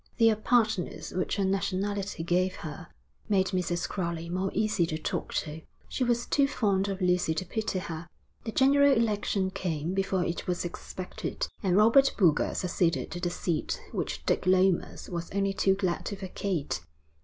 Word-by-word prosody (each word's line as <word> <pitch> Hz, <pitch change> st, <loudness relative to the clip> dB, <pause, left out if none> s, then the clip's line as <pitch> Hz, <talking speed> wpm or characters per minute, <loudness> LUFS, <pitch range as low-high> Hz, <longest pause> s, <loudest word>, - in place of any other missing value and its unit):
The 225 Hz, -1 st, +6 dB
apartness 220 Hz, -3 st, +1 dB
which 185 Hz, -, -1 dB
her 200 Hz, -, +1 dB
nationality 195 Hz, -1 st, -1 dB
gave 180 Hz, +2 st, +1 dB
her, 155 Hz, +2 st, -7 dB, 0.4 s
made 190 Hz, -2 st, +3 dB
Mrs. 180 Hz, -2 st, -1 dB
Crowley 170 Hz, -3 st, -3 dB
more 185 Hz, +2 st, -1 dB
easy 210 Hz, -4 st, +1 dB
to 155 Hz, -, -2 dB
talk 155 Hz, -, -3 dB
to. 155 Hz, +1 st, -7 dB, 0.3 s
She 260 Hz, -, -1 dB
was 240 Hz, -1 st, +1 dB
too 280 Hz, -1 st, +3 dB
fond 200 Hz, -8 st, +1 dB
of 195 Hz, -1 st, -3 dB
Lucy 180 Hz, -3 st, +2 dB
to 185 Hz, -, -2 dB
pity 215 Hz, +1 st, -2 dB
her. 165 Hz, -2 st, -5 dB, 0.4 s
The 225 Hz, -, -4 dB
general 280 Hz, +3 st, +5 dB
election 205 Hz, -4 st, +1 dB
came 165 Hz, -2 st, -2 dB
before 195 Hz, -1 st, +1 dB
it 170 Hz, -, -3 dB
was 180 Hz, -1 st, -1 dB
expected, 180 Hz, +1 st, -5 dB
and 185 Hz, -1 st, +2 dB
Robert 230 Hz, +6 st, +5 dB
Boulger 170 Hz, -8 st, +3 dB
succeeded 175 Hz, -2 st, 0 dB
to 175 Hz, -, -4 dB
the 175 Hz, 0 st, -1 dB
seat 170 Hz, -2 st, -2 dB
which -, -, -3 dB
Dick -, -, +1 dB
Lomas 185 Hz, -1 st, +2 dB
was 170 Hz, -1 st, -4 dB
only 195 Hz, 0 st, +1 dB
too 195 Hz, -1 st, +3 dB
glad 185 Hz, -3 st, -1 dB
to 200 Hz, -, -3 dB
vacate. 190 Hz, -, -3 dB
190 Hz, 165 wpm, -29 LUFS, 175-205 Hz, 0.4 s, The